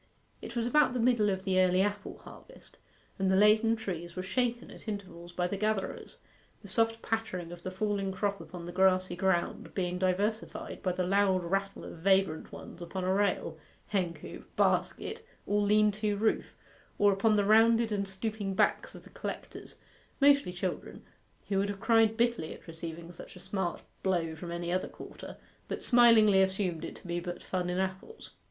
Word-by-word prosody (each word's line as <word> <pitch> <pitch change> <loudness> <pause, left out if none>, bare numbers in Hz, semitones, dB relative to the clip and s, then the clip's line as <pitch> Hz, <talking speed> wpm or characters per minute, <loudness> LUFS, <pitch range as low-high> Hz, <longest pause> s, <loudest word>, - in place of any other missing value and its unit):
It 230 - -8
was 235 -1 0
about 295 +1 +3
the - - 0
middle 230 -3 +3
of 190 -1 -2
the 190 -1 +2
early 185 +1 +4
apple 205 0 -3
harvest, - - -14 0.4
and 190 0 +2
the 190 - +4
laden 215 +3 +5
trees 175 -6 -5
were 185 - -3
shaken 240 +4 -1
at - - -14
intervals 190 -5 -6
by 175 0 -1
the 195 +3 -2
gatherers; 215 -1 -2 0.5
the - - -10
soft 225 0 0
pattering 200 -7 -3
of 175 0 -9
the 185 - -4
falling 195 0 -1
crop 200 +1 -2
upon 175 -2 -9
the 175 - -6
grassy 185 -1 +3
ground 180 -1 -1
being 180 -1 -1
diversified 200 +4 -1
by 185 - 0
the 180 0 -1
loud 190 -1 +2
rattle 195 +3 -2
of - - -9
vagrant 190 -3 +2
ones 175 - -10
upon 180 +2 -4
a 185 +1 +1
rail, 200 +1 0 0.3
hencoop, 170 -6 -3
basket, 450 +1 0 0.2
or 205 +1 +1
lean 210 +1 +4
to 210 0 -1
roof, 220 +2 +1 0.5
or 205 -1 +5
upon 215 +3 +3
the 205 -1 +2
rounded 225 +2 +5
and 200 -1 -1
stooping 195 0 -3
backs - - +1
of - - -11
the - - -16
collectors - - -7 0.4
mostly 280 -8 +5
children, 180 0 -5 0.5
who 195 -1 +2
would 200 +1 0
have 200 -1 -4
cried 225 0 +3
bitterly 235 -9 0
at - - -17
receiving 165 0 -7
such 175 - -11
a - - -11
smart 190 -1 -3 0.2
blow 170 -4 0
from 170 +2 -7
any 170 0 -3
other 185 +1 0
quarter, - - -10 0.3
but - - -5
smilingly 230 -5 +6
assumed 190 -4 0
it - - -6
to - - -16
be 175 0 -2
but 175 0 -6
fun 180 -1 -2
in 180 - -1
apples. 190 - -4
195 Hz, 185 wpm, -30 LUFS, 180-215 Hz, 0.5 s, smilingly